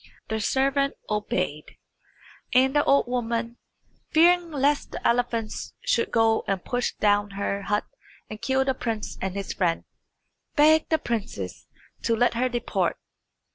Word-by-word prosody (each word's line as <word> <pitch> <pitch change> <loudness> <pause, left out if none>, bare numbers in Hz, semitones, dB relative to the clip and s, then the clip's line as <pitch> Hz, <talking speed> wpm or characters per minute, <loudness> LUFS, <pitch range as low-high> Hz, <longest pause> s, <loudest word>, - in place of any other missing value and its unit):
The 220 0 -1
servant 275 +5 +1 0.2
obeyed, 180 -7 -2 0.8
and 265 +2 +4
the 290 - +4
old 280 - +4
woman, 235 -1 -2 0.5
fearing 345 +2 +4
lest 285 -1 +1
the - - -1
elephants 235 -2 -1
should - - +1
go 225 -1 +3
and 195 -2 -2
push 245 0 -1
down 205 0 +2
her 200 0 -1
hut 205 +1 -1 0.4
and 215 0 -9
kill 265 0 +1
the 265 - +1
prince 225 -4 -4
and 190 0 -3
his 200 -1 -4
friend, 170 -3 0 0.7
begged 315 +1 +5
the 320 - +3
princess 200 - -4 0.3
to 230 - +1
let 245 +2 +2
her 250 +2 +1
depart. 240 -1 -1
235 Hz, 140 wpm, -25 LUFS, 210-275 Hz, 0.8 s, begged